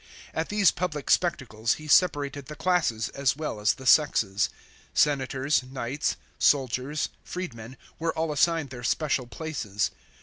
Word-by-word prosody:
At 160 Hz, +1 st, -2 dB
these 205 Hz, -2 st, +4 dB
public 155 Hz, -5 st, -3 dB
spectacles 120 Hz, -11 st, +1 dB
he 155 Hz, -, -10 dB
separated 145 Hz, -5 st, +2 dB
the 150 Hz, -, -7 dB
classes 160 Hz, -9 st, +1 dB
as 135 Hz, -2 st, 0 dB
well 155 Hz, -8 st, -4 dB
as 105 Hz, 0 st, +2 dB
the 130 Hz, -, -11 dB
sexes. 110 Hz, -9 st, +4 dB, 0.5 s
Senators, 135 Hz, 0 st, +2 dB
knights, 130 Hz, +2 st, -3 dB, 0.2 s
soldiers, 135 Hz, +2 st, +1 dB
freedmen 130 Hz, -9 st, -7 dB, 0.2 s
were 165 Hz, 0 st, -1 dB
all 160 Hz, -1 st, 0 dB
assigned 160 Hz, -2 st, +1 dB
their 125 Hz, -2 st, -7 dB
special 135 Hz, -1 st, 0 dB
places. 120 Hz, -5 st, -3 dB
140 Hz, 135 wpm, -27 LUFS, 125-160 Hz, 0.5 s, these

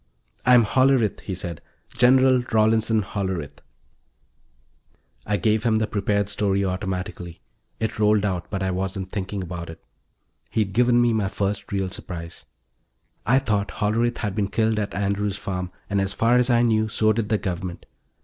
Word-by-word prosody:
"I'm 125 Hz, -2 st, +7 dB
Hollerith," 130 Hz, -2 st, +2 dB
he 95 Hz, -, -5 dB
said. 85 Hz, -3 st, -6 dB, 0.3 s
"General 130 Hz, 0 st, +5 dB
Rawlinson 110 Hz, 0 st, +3 dB
Hollerith." 95 Hz, -7 st, -4 dB, 1.7 s
I 105 Hz, 0 st, +1 dB
gave 105 Hz, +3 st, +1 dB
him 110 Hz, -1 st, +2 dB
the 110 Hz, 0 st, +2 dB
prepared 100 Hz, -1 st, 0 dB
story 100 Hz, -1 st, 0 dB
automatically; 90 Hz, -2 st, -4 dB, 0.4 s
it 110 Hz, -1 st, -3 dB
rolled 105 Hz, -1 st, +3 dB
out 90 Hz, -4 st, -2 dB
but 95 Hz, -2 st, -3 dB
I 95 Hz, -, 0 dB
wasn't 95 Hz, 0 st, -3 dB
thinking 100 Hz, -1 st, -3 dB
about 85 Hz, -1 st, -6 dB
it. 80 Hz, 0 st, -10 dB, 0.7 s
He'd 105 Hz, -3 st, -1 dB
given 120 Hz, +2 st, +4 dB
me 120 Hz, -1 st, +3 dB
my 105 Hz, -3 st, 0 dB
first 100 Hz, +2 st, -3 dB
real 95 Hz, -2 st, -1 dB
surprise; 85 Hz, -3 st, -8 dB, 0.8 s
I'd 130 Hz, +3 st, +3 dB
thought 105 Hz, -2 st, +1 dB
Hollerith 115 Hz, +3 st, 0 dB
had 105 Hz, -4 st, -3 dB
been 100 Hz, -1 st, 0 dB
killed 110 Hz, +1 st, +1 dB
at 100 Hz, -1 st, -3 dB
Andrew's 100 Hz, 0 st, -1 dB
Farm, 90 Hz, -3 st, -4 dB, 0.2 s
and, 100 Hz, -1 st, 0 dB
as 95 Hz, 0 st, -1 dB
far 115 Hz, +3 st, +2 dB
as 125 Hz, +1 st, +2 dB
I 120 Hz, -1 st, +4 dB
knew, 110 Hz, -2 st, +2 dB
so 110 Hz, 0 st, +2 dB
did 110 Hz, -1 st, -2 dB
the 110 Hz, -, +2 dB
Government. 90 Hz, -3 st, -5 dB
105 Hz, 160 wpm, -23 LUFS, 95-110 Hz, 1.7 s, I'm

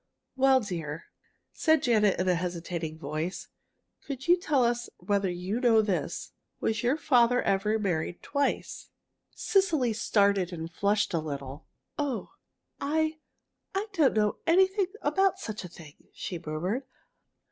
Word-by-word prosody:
"Well, 265 Hz, 0 st, +5 dB
dear," 165 Hz, -7 st, -5 dB, 0.5 s
said 315 Hz, -2 st, +3 dB
Janet, 210 Hz, -6 st, +3 dB
in 185 Hz, -, 0 dB
a 180 Hz, -, +4 dB
hesitating 170 Hz, -2 st, -3 dB
voice, 155 Hz, +5 st, -4 dB, 0.5 s
"could 270 Hz, -1 st, -6 dB
you 350 Hz, -, +7 dB
tell 300 Hz, -8 st, +1 dB
us 240 Hz, 0 st, 0 dB
whether 200 Hz, -2 st, 0 dB
you 180 Hz, +6 st, -3 dB
know 230 Hz, -3 st, +4 dB
this: 200 Hz, -4 st, -2 dB, 0.3 s
was 220 Hz, -1 st, 0 dB
your 250 Hz, +5 st, +2 dB
father 245 Hz, -5 st, +4 dB
ever 205 Hz, +3 st, +1 dB
married 175 Hz, -4 st, -2 dB
twice?" 285 Hz, -1 st, -2 dB, 0.5 s
Cecily 320 Hz, -, +2 dB
started 200 Hz, -4 st, +2 dB
and 165 Hz, -1 st, -6 dB
flushed 205 Hz, +1 st, +1 dB
a 165 Hz, -, +2 dB
little. 140 Hz, -1 st, -6 dB, 0.3 s
"Oh, 265 Hz, -9 st, -2 dB, 0.5 s
I 315 Hz, +2 st, 0 dB, 0.6 s
I 410 Hz, +3 st, -1 dB
don't 310 Hz, -10 st, +3 dB
know 210 Hz, -1 st, +2 dB
anything 380 Hz, +3 st, +4 dB, 0.2 s
about 385 Hz, -1 st, +2 dB
such 215 Hz, -, -6 dB
a -, -, -6 dB
thing!" 155 Hz, -3 st, -13 dB, 0.2 s
she 175 Hz, -3 st, -5 dB
murmured. 180 Hz, -, -2 dB
210 Hz, 135 wpm, -28 LUFS, 175-275 Hz, 0.6 s, you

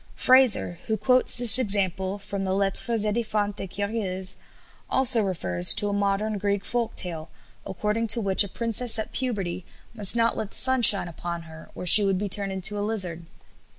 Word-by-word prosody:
Frazer, 255 Hz, -9 st, +2 dB
who 220 Hz, -1 st, -2 dB
quotes 255 Hz, +1 st, 0 dB
this 245 Hz, 0 st, +6 dB
example 195 Hz, -3 st, -3 dB
from 200 Hz, -1 st, -8 dB
the 190 Hz, 0 st, -3 dB
"Lettres 200 Hz, +3 st, -1 dB
édifiantes 210 Hz, -2 st, -4 dB
et 195 Hz, -, -7 dB
curieuses," 195 Hz, -2 st, -4 dB, 0.5 s
also 260 Hz, -3 st, +3 dB
refers 90 Hz, -, +3 dB
to 205 Hz, -1 st, -2 dB
a -, -, -4 dB
modern 200 Hz, +1 st, -3 dB
Greek 200 Hz, 0 st, -3 dB
folk 240 Hz, -2 st, -4 dB
tale, 165 Hz, -3 st, +1 dB, 0.4 s
according 210 Hz, +4 st, -4 dB
to 235 Hz, -, +4 dB
which 195 Hz, -2 st, +6 dB
a 200 Hz, -, -6 dB
princess 230 Hz, +2 st, 0 dB
at 220 Hz, -, -6 dB
puberty 195 Hz, -9 st, -5 dB, 0.3 s
must 210 Hz, -1 st, +3 dB
not 230 Hz, 0 st, -1 dB
let 215 Hz, -, -6 dB
the -, -, -8 dB
sun 260 Hz, -1 st, 0 dB
shine 200 Hz, -5 st, +7 dB
upon 170 Hz, 0 st, -8 dB
her, 160 Hz, 0 st, -15 dB
or -, -, -9 dB
she 205 Hz, +4 st, +5 dB
would 195 Hz, -1 st, -1 dB
be 205 Hz, +2 st, -4 dB
turned 200 Hz, 0 st, +1 dB
into 190 Hz, +2 st, 0 dB
a -, -, -4 dB
lizard. 185 Hz, -6 st, -3 dB
205 Hz, 185 wpm, -23 LUFS, 190-225 Hz, 0.5 s, shine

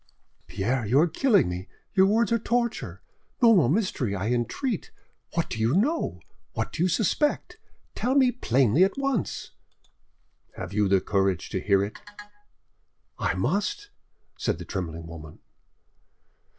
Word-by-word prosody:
"Pierre, 120 Hz, +6 st, -1 dB
you 120 Hz, +7 st, +3 dB
are 165 Hz, -, +5 dB
killing 205 Hz, -, +3 dB
me; 90 Hz, +2 st, -5 dB, 0.3 s
your 190 Hz, -1 st, +5 dB
words 230 Hz, +4 st, +2 dB
are 230 Hz, -, +3 dB
torture. 235 Hz, +1 st, -2 dB, 0.4 s
No 235 Hz, -2 st, +6 dB
more 150 Hz, -11 st, +4 dB
mystery, 150 Hz, -, 0 dB
I 100 Hz, +3 st, -2 dB
entreat. 145 Hz, -, -2 dB, 0.5 s
What 165 Hz, -, 0 dB
do 110 Hz, -, -5 dB
you 115 Hz, +6 st, +2 dB
know? 290 Hz, -, 0 dB, 0.3 s
What -, -, -3 dB
do -, -, -4 dB
you 185 Hz, -, +3 dB
suspect? 290 Hz, -, 0 dB, 0.3 s
Tell 255 Hz, +2 st, -1 dB
me 260 Hz, -3 st, +5 dB
plainly 135 Hz, -, +3 dB
at 195 Hz, +5 st, +1 dB
once." 275 Hz, -7 st, -2 dB, 1.0 s
"Have 90 Hz, +1 st, -7 dB
you 105 Hz, -1 st, +2 dB
courage 95 Hz, -3 st, 0 dB
to -, -, -2 dB
hear 100 Hz, -1 st, +3 dB
it?" 100 Hz, -, -6 dB, 1.2 s
"I -, -, 0 dB
must," 305 Hz, -, -1 dB, 0.5 s
said -, -, 0 dB
the -, -, -8 dB
trembling 85 Hz, -4 st, -5 dB
woman. 80 Hz, -2 st, -10 dB
160 Hz, 140 wpm, -26 LUFS, -, 1.2 s, No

